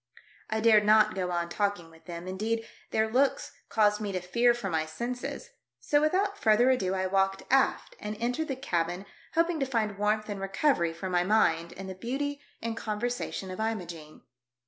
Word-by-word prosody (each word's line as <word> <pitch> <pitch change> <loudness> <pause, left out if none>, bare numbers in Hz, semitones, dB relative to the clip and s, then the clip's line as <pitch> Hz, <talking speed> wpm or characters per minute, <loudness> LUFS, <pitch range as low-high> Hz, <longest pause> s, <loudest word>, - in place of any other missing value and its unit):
I 220 0 -1
dared 215 -2 +6
not 215 +1 +5
go 185 -1 -2
on 170 -1 -1
talk 205 +2 0
ing 165 -1 -14
with 165 0 -19
them, 175 0 -7
indeed, 220 +4 -2 0.2
their 220 0 +1
looks 275 - +1 0.2
caused 210 -1 +3
me 205 -2 -2
to 185 - 0
fear 235 +7 +3
for 240 -5 -4
my 160 -4 0
senses, 245 - -5 0.3
so 290 - +2
without 395 +6 +1
further 230 +4 +5
ado 190 -7 0
I 190 0 0
walked 195 0 +1
aft 270 - +2
and 210 0 -5
entered 250 +7 -1
the 270 - -2
cabin 175 -7 -2 0.3
hoping 335 0 +2
to 270 - +1
find 215 -5 -1
warmth 215 +1 +1
and 200 -2 -5
recovery 195 - +1
for 170 +3 -6
my 175 0 +3
mind 170 -5 +2
in 195 - -8
the 190 - -5
beauty 280 +8 -3 0.2
and 230 -1 -2
conversation 215 -3 -3
of 185 - -7
Imogene. 175 -8 -4
210 Hz, 190 wpm, -29 LUFS, 185-245 Hz, 0.3 s, dared